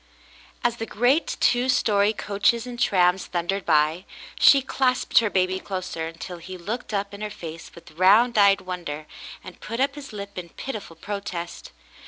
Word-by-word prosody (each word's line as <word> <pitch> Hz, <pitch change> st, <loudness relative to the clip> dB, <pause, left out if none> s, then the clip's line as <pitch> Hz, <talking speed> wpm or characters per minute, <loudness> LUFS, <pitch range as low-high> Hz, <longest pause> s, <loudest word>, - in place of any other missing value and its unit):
As 240 Hz, -1 st, +1 dB
the 225 Hz, -, -4 dB
great 245 Hz, +9 st, +1 dB
two 245 Hz, +1 st, +2 dB
story 205 Hz, -4 st, +3 dB
coaches 220 Hz, +3 st, 0 dB
and 245 Hz, -1 st, -8 dB
trams 185 Hz, -4 st, +2 dB
thundered 180 Hz, +3 st, -2 dB
by, 155 Hz, +3 st, +2 dB, 0.3 s
she 275 Hz, -2 st, +7 dB
clasped 260 Hz, -1 st, +2 dB
her 225 Hz, -2 st, 0 dB
baby 185 Hz, -1 st, +1 dB
closer, 185 Hz, -5 st, -4 dB
until 170 Hz, +2 st, -8 dB
he 185 Hz, +2 st, -8 dB
looked 215 Hz, +9 st, -5 dB
up 200 Hz, -1 st, -2 dB
in 200 Hz, -, -9 dB
her 210 Hz, -, -3 dB
face 165 Hz, -5 st, -9 dB
with 170 Hz, -, -14 dB
round 205 Hz, +9 st, +4 dB
eyed 200 Hz, -1 st, +5 dB
wonder 170 Hz, -5 st, -6 dB, 0.4 s
and 185 Hz, -, -12 dB
put 230 Hz, +2 st, -5 dB
up 275 Hz, +1 st, +2 dB
his 290 Hz, -1 st, -10 dB
lip 200 Hz, -2 st, -7 dB
in 170 Hz, -1 st, -9 dB
pitiful 215 Hz, -5 st, -7 dB
protest. 180 Hz, -2 st, -6 dB
200 Hz, 170 wpm, -24 LUFS, 175-230 Hz, 0.4 s, she